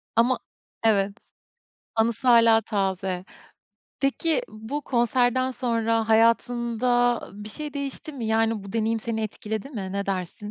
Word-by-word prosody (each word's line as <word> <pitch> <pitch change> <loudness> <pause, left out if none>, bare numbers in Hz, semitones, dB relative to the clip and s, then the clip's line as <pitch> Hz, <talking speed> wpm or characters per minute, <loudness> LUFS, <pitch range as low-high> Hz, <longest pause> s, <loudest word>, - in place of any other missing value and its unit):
Ama 245 +3 +3 0.4
Evet, 200 -3 +3 0.8
anısı 230 +3 +1
hâlâ 230 -1 +7
taze. 190 -3 -2 0.8
Peki, 280 +3 +1
bu 220 +8 -5
konserden 250 +1 +2
sonra 230 -3 0
hayatında 240 +1 +3
ı 205 +1 -10
bir - - -7
şey 295 +5 -7
değişti 280 +2 -5
mi? 240 -5 -5
Yani, 225 -2 +1
bu 195 - -9
deneyim 225 0 0
seni 220 0 -3
etkiledi 215 +3 -4
mi? 200 -7 -5
Ne 200 0 -2
dersin? 195 +2 -4
225 Hz, 130 wpm, -25 LUFS, 215-245 Hz, 0.8 s, hâlâ